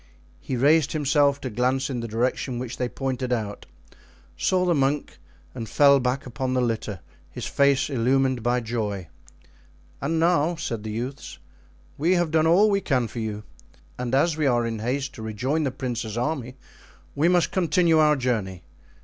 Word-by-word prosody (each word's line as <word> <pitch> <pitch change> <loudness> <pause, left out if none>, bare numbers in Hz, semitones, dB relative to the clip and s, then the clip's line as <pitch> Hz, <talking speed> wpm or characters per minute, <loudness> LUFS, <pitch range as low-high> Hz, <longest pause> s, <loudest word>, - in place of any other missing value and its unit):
He 130 - -4
raised 150 +4 +3
himself 145 -1 +2
to 130 - -4
glance 130 +4 0
in 130 -3 -3
the 115 - -4
direction 120 +3 -1
which 125 0 -5
they 125 -1 -1
pointed 130 -1 -3
out, 105 -4 -3 0.7
saw 185 -1 +1
the 175 - +3
monk, 140 0 -1 0.3
and 115 -4 -6
fell 140 -1 +5
back 130 +2 -1
upon 130 +1 -3
the - - +2
litter, 110 -5 -2 0.3
his 120 - -7
face 140 0 +2
illumined 130 -1 +1
by 120 +2 +1
joy. 105 -6 -3 0.9
"And 160 +4 0
now," 170 0 +2
said 120 -9 -4
the 110 - -6
youths, 125 +6 -5 0.6
"we 165 +5 +3
have 175 -3 0
done 160 0 +3
all 200 +6 +5
we 200 0 +1
can 130 -8 0
for 115 - -7
you; 105 -1 -4 0.6
and 125 +1 -1
as 155 +4 +2
we 155 -2 +1
are 120 -2 +2
in 115 -1 -3
haste 135 +5 -2
to - - -10
rejoin 125 +9 -1
the - - +1
prince's 120 -4 -4
army 130 -1 -2 0.6
we 150 +4 +2
must 175 -1 +3
continue 170 -2 +3
our 150 -1 +5
journey. 110 -9 -2
130 Hz, 175 wpm, -24 LUFS, 120-150 Hz, 0.9 s, fell